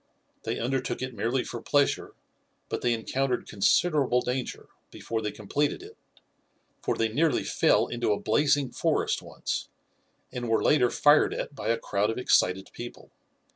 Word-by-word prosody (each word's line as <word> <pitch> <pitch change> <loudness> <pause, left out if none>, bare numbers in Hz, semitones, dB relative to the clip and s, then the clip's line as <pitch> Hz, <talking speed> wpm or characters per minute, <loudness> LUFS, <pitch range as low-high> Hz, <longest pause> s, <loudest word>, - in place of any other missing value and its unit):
They - - -2
undertook 130 +1 -2
it 130 0 -4
merely 115 +4 -1
for 120 - -6
pleasure, 145 -1 +1 0.5
but - - -3
they 120 - +2
encountered 125 +3 -1
considerable 125 - +2
danger, 125 0 -4 0.2
before 115 -1 -4
they 105 -1 -2
completed 140 +9 -2
it, - - -12 0.9
for - - -1
they 115 0 +1
nearly 150 +7 +1
fell - - +3
into 120 -2 -1
a 105 - +1
blazing 140 +2 +2
forest - - 0
once, - - -4 0.6
and 120 -1 -4
were 115 - +2
later 130 -5 +4
fired 145 +4 +4
at - - -4
by 120 -6 -6
a 115 0 +2
crowd 100 +1 -1
of 115 - -2
excited 95 -6 +2
people. 120 0 -9
125 Hz, 155 wpm, -27 LUFS, 110-135 Hz, 0.9 s, later